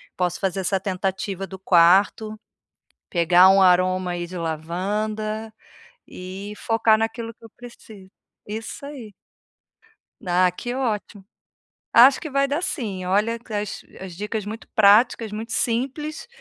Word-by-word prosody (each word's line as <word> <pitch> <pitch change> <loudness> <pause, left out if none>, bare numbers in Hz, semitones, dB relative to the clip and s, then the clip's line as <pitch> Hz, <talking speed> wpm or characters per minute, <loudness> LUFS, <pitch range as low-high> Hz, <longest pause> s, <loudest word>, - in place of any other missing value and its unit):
posso 180 -1 -1
fazer 195 -1 -1
essa 190 +1 0
tentativa 190 0 -3
do 190 - -9
quarto, 190 +4 +3 0.7
pegar 175 +1 +5
um 195 0 +5
aroma 185 0 +3
aí 175 0 -4
de 180 +1 -9
lavanda, 210 +7 -3 0.5
e 190 +3 -8
focar 225 0 +2
naquilo 225 +1 -3
que 230 - -23
eu - - -19
preciso 220 -5 -13 0.4
Isso 220 +6 -7
aí. 255 -8 -9 1.1
Ah 180 0 +3
que 240 +7 -6
ótimo. 215 -5 -3 0.7
Acho 260 +4 +7
que 310 - -6
vai 275 0 +1
dar 290 +4 -1
sim, 205 - -4
olha, 210 +5 +1
as 210 -1 -4 0.2
as 185 -3 -8
dicas 210 +1 -4
muito 220 +2 -8
práticas, 215 +1 +4
muito 225 +2 -6
simples, 270 - -2
205 Hz, 130 wpm, -23 LUFS, 185-225 Hz, 1.1 s, Acho